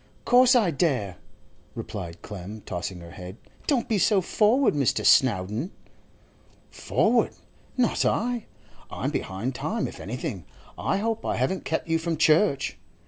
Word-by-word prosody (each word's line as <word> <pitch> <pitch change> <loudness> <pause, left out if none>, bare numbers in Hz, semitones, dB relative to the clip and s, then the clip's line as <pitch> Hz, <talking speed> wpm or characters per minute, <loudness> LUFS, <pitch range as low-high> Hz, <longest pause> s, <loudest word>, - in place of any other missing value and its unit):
'Course 250 +1 +6
I 215 -8 +4
dare,' 130 - 0 0.6
replied 85 -1 -7
Clem, 105 +2 -8
tossing 90 0 -5
her 85 0 -11
head. 90 +3 -9 0.3
'Don't 260 -6 +1
be 215 -3 +1
so 200 +1 +4
forward, 220 +8 +3
Mr. 140 -4 +1
Snowdon.' 110 - +3 1.0
'Forward? - - +1 0.4
Not 245 -3 +2
I. 240 0 0 0.4
I'm - - -3
behind 100 +8 -3
time - - -2
if - - -10
anything. 115 - -5 0.3
I - - -1
hope 225 +2 -2
I - - -1
haven't 135 +10 -1
kept 160 - -2
you 165 0 +1
from 165 -1 -2
church. 155 -1 +2
150 Hz, 140 wpm, -26 LUFS, -, 1.0 s, Course